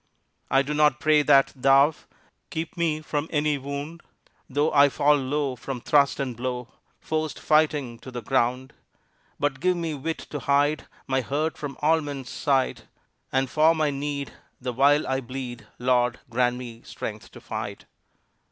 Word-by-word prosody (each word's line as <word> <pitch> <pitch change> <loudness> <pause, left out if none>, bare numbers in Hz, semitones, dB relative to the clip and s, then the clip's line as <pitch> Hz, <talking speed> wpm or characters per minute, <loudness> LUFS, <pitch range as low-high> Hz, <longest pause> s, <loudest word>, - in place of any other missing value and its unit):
I 135 +1 +4
do 145 +2 -3
not 150 -1 +3
pray 155 -1 +4
that 135 -1 +4
Thou 135 +3 +5 0.6
Keep 160 +1 -4
me 160 -3 0
from 150 0 -2
any 150 -1 +1
wound, 140 +5 -6 0.5
Though 145 +3 +1
I 145 -1 +6
fall 145 +2 +3
low 140 0 -1
from 130 +1 -5
thrust 140 +3 +3
and 130 -3 -2
blow, 125 0 -4 0.3
Forced 155 -1 -2
fighting 150 -6 +1
to 130 - -10
the 125 -1 -6
ground; 130 0 0 0.7
But 145 -2 0
give 180 +3 +2
me 165 -2 -2
wit 160 +3 -3
to 145 - -3
hide 145 +3 +1 0.2
My 130 0 +1
hurt 150 +5 -1
from 140 -3 -6
all 160 +1 +4
men's 140 -4 -6
sight, 135 -2 0 0.4
And 135 0 +1
for 155 +4 +4
my 155 -2 +1
need 140 0 -4 0.3
the 125 -1 -4
while 145 +4 +4
I 130 0 -1
bleed, 120 -3 -7
Lord, 125 0 +1
grant 125 +1 +2
me 120 -2 -8
strength - - -7
to - - -11
fight. - - -6
140 Hz, 160 wpm, -25 LUFS, 130-150 Hz, 0.7 s, I